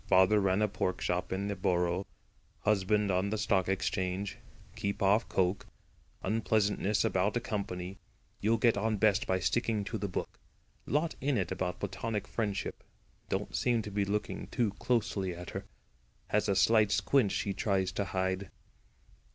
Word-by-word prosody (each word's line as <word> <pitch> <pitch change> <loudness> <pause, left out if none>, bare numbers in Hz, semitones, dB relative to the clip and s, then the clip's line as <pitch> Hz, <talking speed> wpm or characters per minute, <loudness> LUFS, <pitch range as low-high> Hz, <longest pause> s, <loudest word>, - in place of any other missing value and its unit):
Father 95 +3 +5
ran 95 +1 +2
a - - +4
pork 90 -2 -2
shop 90 +1 -1
in 95 +2 -1
the 100 - -2
Borough. 90 0 0 0.5
Husband 105 0 +2
on 95 +2 +1
the 110 - -1
Stock 100 -3 +1
Exchange. 95 0 -1 0.4
Keep 100 0 -2
off 100 +4 +3
coke. 95 0 0 0.6
Unpleasantness 105 -1 +1
about 100 +5 +1
a - - +2
company. 100 -4 -4 0.4
You'll 110 +3 +2
get 115 +1 +4
on 110 +1 0
best 105 0 +3
by 95 0 +2
sticking 105 +4 0
to 110 +2 -4
the 100 - -2
book. 90 - -5 0.5
Lot 155 +3 +1
in 140 -1 +1
it 90 -4 -1
about 90 -1 -2
platonic 110 -3 -3
friendship. 105 -4 -3 0.5
Don't - - -2
seem 120 -3 +2
to 105 - -6
be 100 0 +1
looking 105 +1 -2
too 115 -5 0
closely 105 -7 0
at 90 0 -8
her. - - -5 0.6
Has - - +1
a 100 - +3
slight 105 +2 +4
squint 130 -8 +3
she 100 - -1
tries 95 -2 0
to 100 +1 -2
hide." 95 +1 -1
100 Hz, 160 wpm, -31 LUFS, 95-110 Hz, 0.6 s, Father